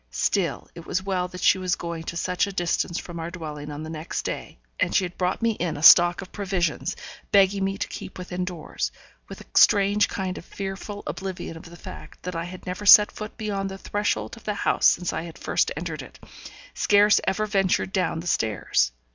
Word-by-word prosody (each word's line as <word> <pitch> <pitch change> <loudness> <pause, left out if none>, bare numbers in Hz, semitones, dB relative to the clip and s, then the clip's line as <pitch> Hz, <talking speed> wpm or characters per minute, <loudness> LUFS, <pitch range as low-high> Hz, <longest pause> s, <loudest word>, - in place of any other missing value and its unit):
Still - - -1
it 170 - -11
was 190 - -1
well 185 -2 -1
that 180 0 -8
she 190 - +5
was 185 -2 0
going 170 -1 -5
to 170 - -5
such 180 +3 0
a - - -5
distance 175 -1 -1
from 170 -1 -6
our 165 +1 -4
dwelling 150 -4 -7
on 150 +1 -6
the 155 - -7
next 160 0 -4
day; - - -5 0.2
and - - +1
she 190 - +3
had 175 - -8
brought 185 +5 -1
me 230 - +3
in 175 -6 -3
a 145 - -6
stock 175 +2 +8
of 185 - -14
provisions, 185 -6 -1 0.4
begging 195 0 +4
me 195 0 -1
to - - -2
keep - - -8
within 180 0 -4
doors, 165 - -4 0.4
with - - -10
a - - -13
strange 205 +1 +5
kind 190 -2 -4
of - - -14
fearful 200 +1 -6
oblivion 180 +2 -5
of 165 +1 -11
the 170 - -12
fact - - -11
that 180 -1 -5
I 165 0 -2
had 180 +1 -9
never 180 +3 -5
set 210 +1 +9
foot 215 0 -8
beyond 200 -3 -2
the 195 - -7
threshold 190 - -2
of - - -15
the 210 - -2
house - - +3
since 180 0 +2
I - - -2
had 165 -1 -9
first - - 0
entered - - -4
it - - -12 0.6
scarce 205 +1 +4
ever 205 +3 0
ventured 195 -2 +1
down 180 -4 0
the - - -11
stairs. 105 - +1
180 Hz, 215 wpm, -25 LUFS, 170-195 Hz, 0.6 s, set